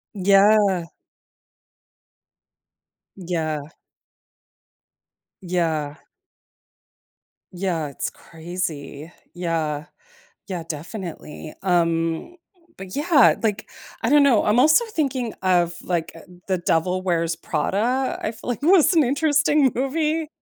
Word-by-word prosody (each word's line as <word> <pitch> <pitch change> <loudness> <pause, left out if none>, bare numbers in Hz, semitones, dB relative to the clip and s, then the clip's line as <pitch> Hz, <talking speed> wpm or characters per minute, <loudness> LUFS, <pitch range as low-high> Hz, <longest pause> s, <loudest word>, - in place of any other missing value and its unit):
Yeah. 200 -1 +4 2.3
Yeah. 165 -5 -3 1.8
Yeah. 160 -5 -1 1.6
Yeah, 175 -5 -2
it's 140 - -4
crazy. 165 -2 -6 0.2
Yeah, 165 -3 -2 0.6
yeah, 180 -3 -4
definitely. 165 -2 -7
Um 170 - 0 0.4
but 190 +3 -8
yeah, 295 -3 +5
like, 220 -1 -2 0.3
I 225 - +1
don't 290 +2 +6
know 260 -6 +4
I'm 210 +3 +2
also 310 - +5
thinking 270 - -2
of, 175 -2 +2
like, 170 -3 -2
eh 165 - -12 0.3
The 185 - +1
Devil 175 +2 0
Wears 170 -2 0
Prada, 215 - -1
I 215 - -2
feel 230 +2 -11
like 245 +3 -4
was 350 +1 +5
an 320 -3 +5
interesting 290 +1 +2
movie. 305 +4 -1
185 Hz, 95 wpm, -22 LUFS, 165-260 Hz, 2.3 s, don't